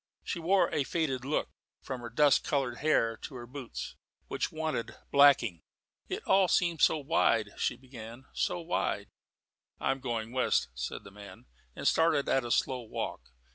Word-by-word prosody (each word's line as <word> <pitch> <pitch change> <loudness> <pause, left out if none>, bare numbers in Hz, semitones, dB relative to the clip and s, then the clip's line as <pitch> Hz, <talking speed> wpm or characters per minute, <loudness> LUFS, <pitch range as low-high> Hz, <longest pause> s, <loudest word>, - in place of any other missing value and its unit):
She 175 - -3
wore 185 +4 +3
a 145 - +2
faded 135 -5 -1
look, 145 +3 -1 0.3
from 130 -2 -5
her 120 - -6
dust 145 +4 +4
coloured 135 -5 -1
hair 115 -7 +2
to 135 - -9
her 120 -1 -7
boots, 130 0 -7 0.3
which - - -1
wanted 155 -7 -3 0.2
blacking. 135 - +5 0.5
"It - - -3
all 190 -1 +4
seems 170 -2 +2
so 160 - +2
wide," 125 -7 +2
she - - 0
began; 120 -1 -11
"so 180 - 0
wide 170 +1 -2 0.3
" - - -52
"I'm 135 0 0
going 115 -3 -3
west," 125 - +1
said - - -5
the 100 - -12
man, 100 -2 -12 0.3
and - - -2
started 160 -3 +3
at 135 - +2
a 120 - -5
slow 125 +2 +1
walk. 115 - -5
130 Hz, 170 wpm, -30 LUFS, 115-155 Hz, 0.5 s, blacking